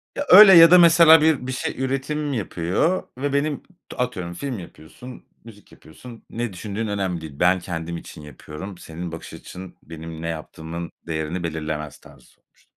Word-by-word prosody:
Ya 285 - -3
öyle 195 +1 +10
ya 165 -1 +8
da 180 - +9
mesela 165 -2 +7
bir 155 -5 +1
bir - - -3
şey 130 - -4
üretim 140 +3 -3
yapıyor 105 - -1
ve 140 +1 -3
benim 140 0 -1 0.3
atıyorum, 95 -9 -4
film 130 +3 -5
yapıyorsun, 85 - -13 0.2
müzik 110 -3 -16
yapıyorsun, 115 +8 -15
ne 120 -3 -5
düşündüğün 105 +4 -5
önemli 95 -4 -3
değil. 80 -2 -9
Ben, 90 +1 +3
kendim 85 -1 -6
için 75 - -12
yapıyorum, 75 +5 -10
senin 85 +1 -8
bakış 80 - -10
açın 95 0 -11
benim 80 0 -10
ne 85 - -5
yaptığımın 80 +1 -7 0.2
değerini 80 +2 -4
belirlemez 75 -2 -5
tarzı - - -19
sormuştum. - - -30
95 Hz, 165 wpm, -22 LUFS, 80-135 Hz, 0.3 s, öyle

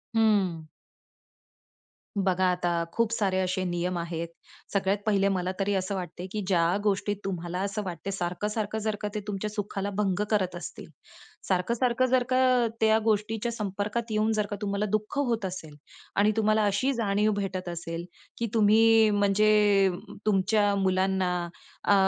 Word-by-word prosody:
हम्म. 195 -8 +2 1.5
बघा 185 -1 +2
आता, 175 -1 0
खूप 230 -1 +1
सारे 195 -5 0
असे 185 0 0
नियम 175 0 -1
आहेत. 170 0 -3 0.5
सगळ्यात 195 0 +1
पहिले, 200 -2 +3
मला 185 -1 -1
तरी 200 +1 +1
असं 190 +1 -1
वाटते 180 -1 -6
की 215 - -2
ज्या 175 -1 +2
गोष्टी 205 0 +1
तुम्हाला 175 -2 -3
असं 200 +1 -2
वाटते 185 +1 -5
सारखं-सारखं 210 +4 -2
जर 215 0 -1
का 210 - -1
ते - - 0
तुमच्या 205 +1 -3
सुखाला 205 -1 -3
भंग 205 -1 +1
करत 185 -4 +1
असतील, 175 - -8 0.6
सारखं-सारखं 235 +7 +1
जर 255 0 +3
का, 255 -2 +3
त्या 220 0 +5
गोष्टीच्या 220 +1 0
संपर्कात 210 +2 -3
येऊन 215 +1 +2
जर 210 -1 +1
का 205 - -3
तुम्हाला 200 0 -1
दुःख 215 +5 -1
होत 230 -4 -1
असेल 170 -5 -6 0.4
आणि 210 +2 +4
तुम्हाला 215 0 +3
अशी 205 +7 +1
जाणीव 210 -2 +1
भेटत 190 -3 -3
असेल 170 0 -5 0.3
की 235 - -1
तुम्ही 225 0 +5
म्हणजे 205 -1 +4 0.4
तुमच्या 205 0 +2
मुलांना 190 -1 +1 0.5
अ, 205 - +4
200 Hz, 145 wpm, -27 LUFS, 185-215 Hz, 1.5 s, त्या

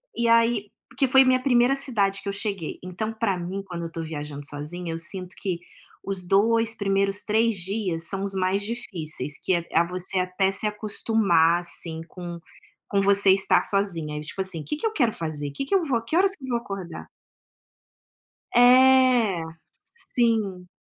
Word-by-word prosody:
E 235 0 0
aí, 230 -3 +3 0.2
porque 270 0 0
foi 265 +1 +6
minha 255 0 +3
primeira 250 0 +3
cidade 205 -8 0
que - - -10
eu - - -3
cheguei, 200 -5 -4
então, 215 +5 -4
pra 215 -4 -1
mim, 185 +3 -5
quando 175 -3 -7
eu - - -3
estou 165 0 -6
viajando 145 -2 -7
sozinha, 165 +4 -5
eu - - -4
sinto 180 +2 -2
que 180 -4 -3 0.4
os 190 -2 -2
2 225 +3 +2
primeiros 195 0 0
3 225 +1 +2
dias 185 -3 -2
são 195 0 -2
os 200 -1 -2
mais 190 +1 0
difíceis, 170 -10 -4
que, 190 - +2
eh 170 0 -3 0.2
você 185 +1 -2
até 185 +1 0
se 210 +2 0
acostumar 205 -5 +2
assim 165 -2 -3
com 175 0 -8 0.6
você 200 -1 +5
estar 195 0 +3
sozinha 170 -7 0
e, - - -4
tipo 150 +6 -5
assim: 185 -4 -1
"O - - -11
que 300 +8 -4
eu 440 - +1
quero 240 - +1
fazer? 150 -3 -4
O - - -12
que 275 - -3
eu 390 - +5
vou 330 - -4
fazer? 230 -2 0
Que 320 - -2
horas 385 +1 +4
eu 260 - -8
vou 240 - +1
acordar?". 195 -6 -8 1.5
É, 250 -6 +5 0.7
sim. 215 -7 0
195 Hz, 175 wpm, -24 LUFS, 175-230 Hz, 1.5 s, foi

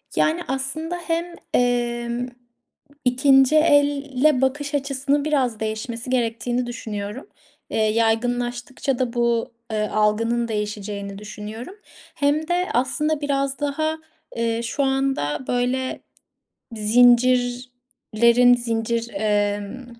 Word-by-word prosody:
Yani, 325 +3 +2
aslında 270 +6 -3
hem, 340 +1 -2 0.2
emm, 240 0 0 0.8
2'nci 270 +2 +4
elle 285 -2 +3
bakış 285 +2 -1
açısının 280 +1 0
biraz 260 -7 0
değişmesi 225 +3 -4
gerektiğini 245 0 0
düşünüyorum. 215 - -6 0.4
Eee, - - -3
yaygınlaştıkça 240 +4 0
da 250 -2 -1
bu, 235 0 0 0.2
eee, 215 -1 0
algının 230 +3 +1
değişeceğini 210 -2 -4
düşünüyorum. 215 - -8 0.4
Hem 295 +2 +1
de 355 +1 0
aslında 300 +5 0
biraz 275 -1 -1
daha, 310 +2 -1 0.4
eee, 230 0 -1
şu 255 +5 -1
anda 265 - -1
böyle 250 +1 -1 0.8
zincirlerin 245 +1 +3
zincir, 230 -1 -1
emm 205 +3 -1
245 Hz, 95 wpm, -22 LUFS, 230-275 Hz, 0.8 s, 2'nci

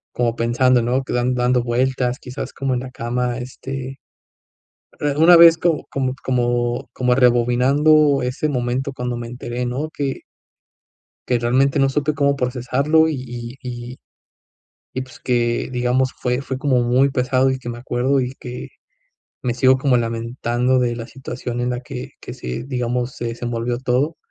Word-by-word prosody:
como 120 -1 0
pensando, 125 +2 +3
¿no?, 125 +3 0
que 130 - -6
dan 125 +1 +1
dando 125 0 +2
vueltas, 125 +1 0
quizás 130 +2 -6
como 135 -1 -2
en - - 0
la 130 0 -8
cama, 120 0 -2
este, 135 +1 -6 1.0
eh, 145 -1 0
una 170 +3 +7
vez 165 -1 +9
co 165 -2 0
como 130 -2 -1
como 120 -2 0
como 125 0 +1
rebobinando 135 +4 +4
ese 130 +5 -1
momento 130 +1 -1
cuando 125 -2 -3
me 120 0 -5
enteré, 120 0 -4
¿no?, 130 +6 -2
que 140 -4 -3 1.1
que 125 - +2
realmente 130 +4 +2
no 135 -1 +4
supe 150 +2 0
cómo 140 -1 +2
procesarlo 135 +5 +2
y 160 - -1
y 120 +1 -7
y 120 0 -7 1.0
y 130 - -2
pues, 130 -2 -11
que 120 -1 0
digamos 125 +1 +1
fue 125 +1 -1
fue 135 -1 -4
como 130 -3 +2
muy 125 +3 +3
pesado, 130 +1 +2
y 130 - -2
que 120 - -7
me 120 - -5
acuerdo 130 +2 0
y 125 0 -3
que 125 0 -7 0.8
me 125 -2 -1
sigo 130 +1 +4
como 130 -1 +3
lamentando 120 +2 0
de 120 -1 +1
la 115 -1 -6
situación 125 -2 -5
en 125 - 0
la 125 0 -2
que 125 0 -7
que - - -8
se 60 - -5
digamos, 125 -1 -2
se 120 - -4
desenvolvió 120 0 -3
todo. 130 +5 0
125 Hz, 170 wpm, -20 LUFS, 120-135 Hz, 1.1 s, vez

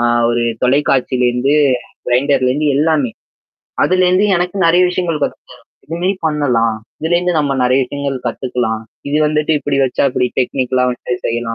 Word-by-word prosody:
அ - - +1 0.3
ஒரு 120 0 0 0.2
தொலைக்காட்சியிலருந்து 130 -1 +1 0.5
கிரைண்டர்லருந்து 135 +2 +1
எல்லாமே. 150 -4 +1 0.7
அதுலருந்து 185 +2 +3
எனக்கு 180 +2 -2
நெறைய 175 +2 +4
விஷயங்கள் 170 -4 -2
கத்துதர - - -8 0.3
இதுமாரி 175 +5 -1
பண்ணலாம். 125 -8 +1 0.2
இதுலேருந்து 175 +2 +1
நம்ம 140 -2 0
நெறைய 130 +2 +3
விஷயங்கள் 140 +1 -4
கத்துக்கலாம். 120 -4 -2 0.3
இது 145 - 0
வந்துட்டு 150 +1 0
இப்பிடி 140 -1 -1
வச்சா 130 +2 0
இப்பிடி 125 0 0
டெக்னிக்கலா 125 0 0
வந்து 125 0 -4
செய்யலாம் 115 0 -2
140 Hz, 130 wpm, -16 LUFS, 125-160 Hz, 0.7 s, நெறைய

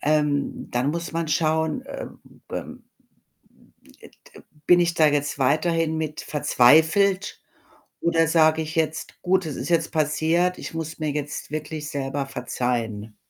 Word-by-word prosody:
Ähm, 150 -2 0
dann 125 +4 0
muss 170 +2 -4
man 165 -1 -2
schauen, 160 0 +1
äh, - - -7 0.5
ähm, - - -6 1.2
e - - -14 0.2
de - - -13 0.2
bin 175 0 +6
ich 175 -1 +2
da 160 -2 +4
jetzt 145 -1 0
weiterhin 160 +4 +1
mit 155 -1 -3
verzweifelt? 160 +8 +3 0.6
Oder 165 -2 +2
sage 160 -1 +4
ich 160 +1 -7
jetzt: 160 -1 -2
„Gut, 185 -1 +1
es 150 - -5
ist - - -5
jetzt 165 -1 +1
passiert, 160 +3 +1
ich - - -7
muss 160 -1 -5
mir 155 -1 -1
jetzt 150 0 -5
wirklich 155 0 -5
selber 140 0 -3
verzeihen“? 115 -5 -3
155 Hz, 145 wpm, -24 LUFS, 145-165 Hz, 1.2 s, bin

